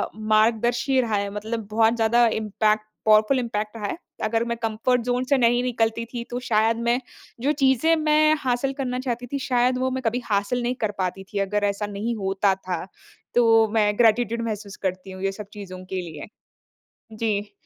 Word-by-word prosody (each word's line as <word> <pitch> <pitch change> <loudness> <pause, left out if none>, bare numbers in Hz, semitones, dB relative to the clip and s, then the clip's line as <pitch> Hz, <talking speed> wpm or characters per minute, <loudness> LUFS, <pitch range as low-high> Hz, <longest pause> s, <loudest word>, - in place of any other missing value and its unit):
मार्गदर्शी 225 +4 +2
रहा 225 -3 -1
है, 200 0 -1
मतलब 215 +1 -4
बहुत 225 +1 +3
ज़्यादा 235 +1 +3
इम्पैक्ट 215 0 0 0.2
पावरफुल 215 +4 +5
इम्पैक्ट 215 -3 -3
रहा 210 - -5
है। - - -4 0.3
अगर 225 +1 +1
मैं 235 0 -2
कम्फर्ट 225 +3 +1
ज़ोन 245 +1 0
से 280 - +4
नहीं 240 -1 +3
निकलती 230 -2 0
थी 235 - -3
तो 245 - -3
शायद 225 +1 +3
मैं 240 +2 +3 0.4
जो 280 +4 +2
चीज़ें 270 +5 +4
मैं 305 0 +4
हासिल 260 0 0
करना 255 -2 -3
चाहती 245 -1 -3
थी 280 - 0
शायद 250 0 +2
वो 260 +1 0
मैं 260 0 -2
कभी 230 +2 +1
हासिल 205 +4 0
नहीं 245 +1 -1
कर 215 -2 0
पाती 190 0 -2
थी 200 - -1
अगर 205 +1 0
ऐसा 200 +1 -3
नहीं 230 +3 -2
होता 195 -1 +1
था। 185 -3 -4 0.5
तो 225 -2 +5
मैं 210 -2 +3
ग्रैटीट्यूड 235 0 +3
महसूस 210 -2 -5
करती 185 +1 -3
हूँ, 190 0 -8
ये 195 - +1
सब 210 +2 -8
चीज़ों 185 -3 -8
के 185 0 -3
लिए। 160 -4 -8 0.9
जी। 210 -2 -2
225 Hz, 185 wpm, -24 LUFS, 210-245 Hz, 0.9 s, पावरफुल